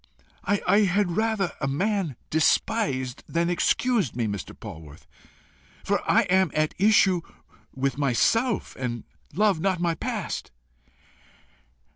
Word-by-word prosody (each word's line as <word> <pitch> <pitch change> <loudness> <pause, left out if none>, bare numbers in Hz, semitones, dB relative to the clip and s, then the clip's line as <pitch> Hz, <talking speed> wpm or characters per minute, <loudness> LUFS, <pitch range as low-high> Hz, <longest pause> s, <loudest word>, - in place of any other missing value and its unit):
I 205 +1 +2
had 195 -3 +1
rather 220 -4 0
a 135 - 0
man 185 - -1 0.2
despised 150 - +1
than 170 +1 0
excused 195 - +1
me, 120 -2 -1
Mr. 100 -4 -5
Polwarth, 75 -2 -11 0.8
for - - 0
I 225 - +5
am 190 -2 +2
at 155 0 +1
issue 195 -3 +4 0.5
with 135 +1 -1
myself, 215 - +1
and 120 -3 -4 0.3
love 205 -3 +2
not 185 +1 0
my 170 -1 +1
past." 160 - -4
175 Hz, 115 wpm, -25 LUFS, 135-205 Hz, 0.8 s, I